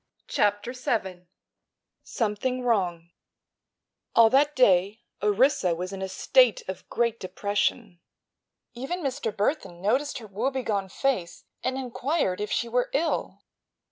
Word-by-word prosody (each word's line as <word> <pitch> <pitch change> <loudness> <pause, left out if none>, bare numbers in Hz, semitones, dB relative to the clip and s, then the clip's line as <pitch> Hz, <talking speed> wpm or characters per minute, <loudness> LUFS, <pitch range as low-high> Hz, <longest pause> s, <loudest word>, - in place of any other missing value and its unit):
CHAPTER 205 +3 0
VII 190 -8 -3 0.7
SOMETHING 250 +3 -2
WRONG 175 -8 0 1.0
All 225 -1 +7
that 290 +2 +3
day 205 -1 +3 0.2
Orissa 210 - +3
was 180 +3 -5
in 195 - -6
a 190 - -3
state - - +3
of - - -7
great 235 -1 0
depression. 200 +1 -2 0.7
Even 275 +9 -4
Mr. 265 -4 -2
Burthon 205 - -2
noticed 255 +11 0
her 235 - -9
woebegone 215 -2 -2
face 190 -6 -2 0.2
and 260 +1 -1
inquired 260 - -1
if 210 - -2
she 235 - 0
were 245 +1 0
ill. 315 +4 -1
225 Hz, 120 wpm, -26 LUFS, 190-260 Hz, 1.0 s, All